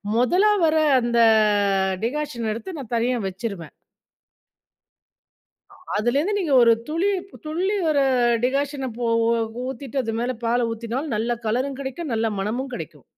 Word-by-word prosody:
மொதலா 360 Hz, -, +3 dB
வர 315 Hz, -, +2 dB, 0.2 s
அந்த 235 Hz, -1 st, -1 dB, 0.9 s
டிகாஷன் 250 Hz, -3 st, -2 dB
எடுத்து 330 Hz, -, -7 dB
நான் 245 Hz, -3 st, -7 dB
தனியா 240 Hz, +1 st, +1 dB
வச்சுருவேன். 190 Hz, -, -6 dB, 2.0 s
அ -, -, -16 dB, 0.2 s
அதிலிருந்து 280 Hz, -, +1 dB
நீங்க 340 Hz, -7 st, -1 dB
ஒரு 230 Hz, -, +6 dB, 0.2 s
துளி 330 Hz, +6 st, 0 dB, 0.4 s
துள்ளி 360 Hz, +7 st, -1 dB
ஒரு 290 Hz, -3 st, +3 dB, 0.4 s
டிகாஷன 275 Hz, +1 st, -1 dB
போ 240 Hz, -, -1 dB, 0.6 s
ஊத்திட்டு, 265 Hz, +1 st, -7 dB
அது 225 Hz, -2 st, -3 dB
மேல 250 Hz, +1 st, -1 dB
பால 235 Hz, +1 st, +1 dB
ஊத்தினால், 235 Hz, +6 st, -4 dB
நல்ல 235 Hz, +2 st, -1 dB
கலரும் 260 Hz, +5 st, -1 dB
கெடைக்கும், 275 Hz, +1 st, -5 dB
நல்ல 225 Hz, 0 st, 0 dB
மணமும் 245 Hz, +7 st, -3 dB
கெடைக்கும். -, -, -8 dB
255 Hz, 125 wpm, -23 LUFS, 230-295 Hz, 2.0 s, ஒரு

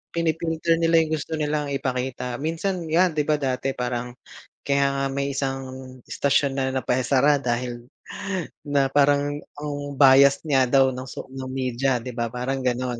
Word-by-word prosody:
pini-filter 165 Hz, 0 st, 0 dB
nila 165 Hz, 0 st, +3 dB
yung 155 Hz, -, -5 dB
gusto 155 Hz, +1 st, -4 dB
nilang 150 Hz, -1 st, -1 dB
ipakita. 125 Hz, -2 st, -3 dB
Minsan, 165 Hz, +3 st, -2 dB
‘yan 175 Hz, +3 st, +3 dB
‘di 150 Hz, -, +2 dB
ba 155 Hz, -, +3 dB
dati 135 Hz, -1 st, -1 dB
parang, 125 Hz, 0 st, -3 dB, 0.5 s
kaya 140 Hz, 0 st, +2 dB
nga 135 Hz, 0 st, 0 dB
may 140 Hz, 0 st, -2 dB
isang 135 Hz, -1 st, -1 dB, 0.5 s
istasyon 140 Hz, 0 st, +1 dB
na 135 Hz, -1 st, 0 dB
napaisara 130 Hz, +3 st, +2 dB
dahil 120 Hz, -1 st, -3 dB, 0.8 s
na 140 Hz, -2 st, +2 dB
parang 145 Hz, 0 st, +3 dB, 0.2 s
ang 145 Hz, -1 st, -4 dB, 0.2 s
bias 140 Hz, 0 st, +6 dB
nga 135 Hz, -3 st, +4 dB
daw 135 Hz, 0 st, +4 dB
nung 130 Hz, +1 st, -7 dB
so -, -, -7 dB
nung 130 Hz, -1 st, -6 dB
media 130 Hz, 0 st, 0 dB
‘di 125 Hz, -, -5 dB
ba, 120 Hz, -1 st, -1 dB
parang 130 Hz, +2 st, -3 dB
gano'n. 125 Hz, -1 st, -1 dB
135 Hz, 155 wpm, -24 LUFS, 125-150 Hz, 0.8 s, bias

